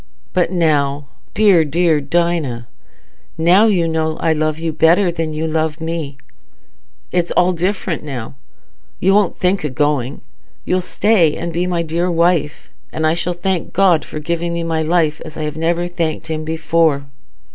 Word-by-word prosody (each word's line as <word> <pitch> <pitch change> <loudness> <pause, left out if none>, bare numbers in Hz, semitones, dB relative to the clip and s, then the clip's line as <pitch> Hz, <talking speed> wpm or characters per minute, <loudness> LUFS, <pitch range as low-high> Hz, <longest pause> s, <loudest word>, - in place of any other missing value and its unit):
"But 180 -2 +1
now, 145 -5 0 0.3
dear, 200 -6 +5
dear 160 0 +1
Dinah, 145 -6 -1 0.7
now 180 +7 +5
you 180 -6 +2
know 160 -1 -1
I 160 - +1
love 155 0 -1
you 165 -1 -3
better 170 +4 +3
than 165 -2 -3
you 155 +1 -3
love 160 0 -1
me... 160 -4 -4 0.9
it's 175 -1 0
all 180 +1 +4
different 180 -1 -2
now. 130 - -6 0.7
You 195 +1 +3
won't 205 -3 +2
think 185 0 0
o' 150 - -1
going. 140 -1 -1 0.4
You'll 185 0 +1
stay, 180 -3 +2
and 170 0 -4
be 175 +2 -1
my 175 -2 -1
dear 170 +3 -1
wife, 170 -3 0 0.2
and 160 - -2
I 155 - +3
shall 170 +1 -2
thank 180 -1 -2
God 185 -4 +3
for - - -8
giving 170 +2 -2
me 170 0 -2
my 165 -1 -1
life 160 -1 +1
as 155 -1 -10
I 155 -1 -2
never 165 +3 -1
thanked 170 -3 -3
him 155 -1 -3
before." 160 -2 +1
165 Hz, 165 wpm, -18 LUFS, 155-175 Hz, 0.9 s, dear